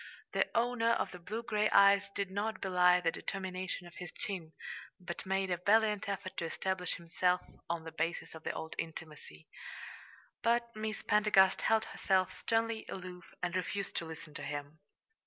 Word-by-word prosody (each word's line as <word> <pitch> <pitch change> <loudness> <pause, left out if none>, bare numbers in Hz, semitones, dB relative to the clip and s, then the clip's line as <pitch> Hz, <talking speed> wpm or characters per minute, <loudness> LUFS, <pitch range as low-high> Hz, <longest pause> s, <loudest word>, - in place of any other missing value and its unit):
The - - +3
owner 230 0 +3
of - - 0
the 180 - -9
blue 215 +7 -4
gray 215 -2 +2
eyes 200 0 +6
did 200 -2 -1
not 215 +3 -1
belie 180 -1 +5
the 165 -2 +2
determination 185 -1 -4
of 175 - -12
his 180 - -6
chin, 175 -6 -4 0.5
but 180 0 -6
made 190 0 +1
a 175 - +2
valiant 210 +2 +3
effort 190 -1 -4
to 170 - -1
establish 180 +1 -1
himself 180 +1 +1 0.3
on 170 -1 -1
the 160 - -7
basis 165 +1 -2
of 160 - -9
the - - -1
old 160 - -5
intimacy; 155 - -7 0.9
but 235 0 +2
Miss 215 0 -3
Pendergast 210 -3 +5
held 220 0 +3
herself 185 -1 +1
sternly 225 -1 0
aloof, 180 -2 -7 0.2
and 180 0 0
refused 195 +2 -2
to 170 - -1
listen 160 -1 -9
to - - -6
him. 145 +1 -5
185 Hz, 170 wpm, -34 LUFS, 170-210 Hz, 0.9 s, eyes